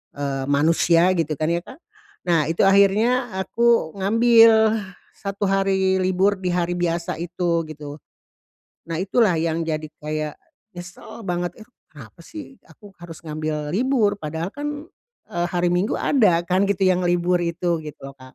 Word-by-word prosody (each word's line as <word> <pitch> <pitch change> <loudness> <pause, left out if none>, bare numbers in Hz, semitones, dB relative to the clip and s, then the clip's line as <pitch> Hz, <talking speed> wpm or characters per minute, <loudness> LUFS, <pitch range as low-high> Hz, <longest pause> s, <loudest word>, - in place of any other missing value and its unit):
eee, 140 -1 -3
manusia 165 +4 +3
gitu 160 -2 -1
kan 155 - 0
ya, 170 - +1
Kak? 260 - -12 0.5
Nah 165 -4 +2
itu 165 +4 +1
akhirnya 215 +5 +3
aku 230 -3 +1
ngambil 225 +1 +5 0.4
satu 200 0 -5
hari 190 -1 +1
libur 190 +2 +1
di 185 - -4
hari 175 0 -1
biasa 170 -1 -2
itu 170 -1 -1
gitu. 150 -1 -9 0.9
Nah 165 - -3
itulah 200 -1 +2
yang 165 0 -1
jadi 155 -1 -3 0.2
kayak 155 0 -3 0.4
nyesel 175 +5 -11
banget. 175 -1 -2
Eh - - -32 0.2
kenapa 145 0 -14
sih 280 - -11
aku 205 -2 -16
harus 170 -2 -10
ngambil 155 -1 -4
libur, 235 -3 +2
padahal 160 +3 -4
kan, 295 +1 -5 0.5
eee, 175 0 -1
hari 175 -1 0
Minggu 180 +4 0
ada 195 -11 +3
kan 185 +2 +2
gitu 200 -1 -1
yang 185 -1 +2
libur 175 0 +1
itu 170 0 -1
gitu 150 -2 -10
lho, 135 - -8
Kak. 130 -1 -16
175 Hz, 155 wpm, -22 LUFS, 160-200 Hz, 0.9 s, ngambil